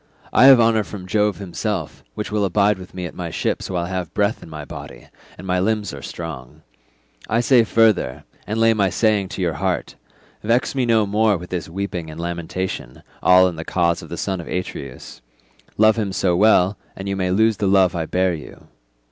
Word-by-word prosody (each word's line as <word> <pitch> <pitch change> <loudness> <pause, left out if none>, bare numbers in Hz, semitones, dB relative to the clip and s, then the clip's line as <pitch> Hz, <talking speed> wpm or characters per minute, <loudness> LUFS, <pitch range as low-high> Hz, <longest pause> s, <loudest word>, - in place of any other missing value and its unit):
I - - +6
have 135 -2 +9
honour 115 -2 +3
from 100 -3 -9
Jove 105 +2 +1
himself, 95 - -4
which 105 - -5
will 105 -1 0
abide 100 +1 +2
with 90 0 -12
me 90 -1 -4
at 85 - -7
my - - -5
ships - - -2
while 90 -2 -1
I - - -7
have 90 -4 -4
breath 105 +2 +1
in - - -12
my 75 -2 -7
body, - - -10 0.3
and - - -10
my 90 -1 0
limbs 105 0 -1
are - - -8
strong. 75 -7 -8 0.7
I 115 - +2
say 120 0 +5
further—and 110 - 0
lay 115 0 +5
my 100 -3 +1
saying 105 -1 +1
to 95 - -4
your 85 -2 0
heart—vex 95 - -3
me 130 -3 0
no 110 -2 +3
more 105 0 +2
with 90 +1 -11
this 85 -4 -4
weeping 90 -2 -4
and 80 +1 -9
lamentation, 85 -5 -5 0.2
all 90 0 +6
in 85 -3 -5
the 80 - -5
cause 85 -1 0
of - - -11
the - - -6
son 95 -3 -2
of - - -11
Atreus. 90 -8 -6 0.6
Love 110 +1 +5
him 105 -3 -1
so 90 -2 +1
well, 100 0 +4 0.2
and 95 - -7
you 100 - -1
may 95 -1 -1
lose 110 +3 +2
the 100 - 0
love 95 -2 +4
I 80 -2 -2
bear 90 0 +1
you. 75 -3 -10
95 Hz, 205 wpm, -21 LUFS, 85-105 Hz, 0.7 s, have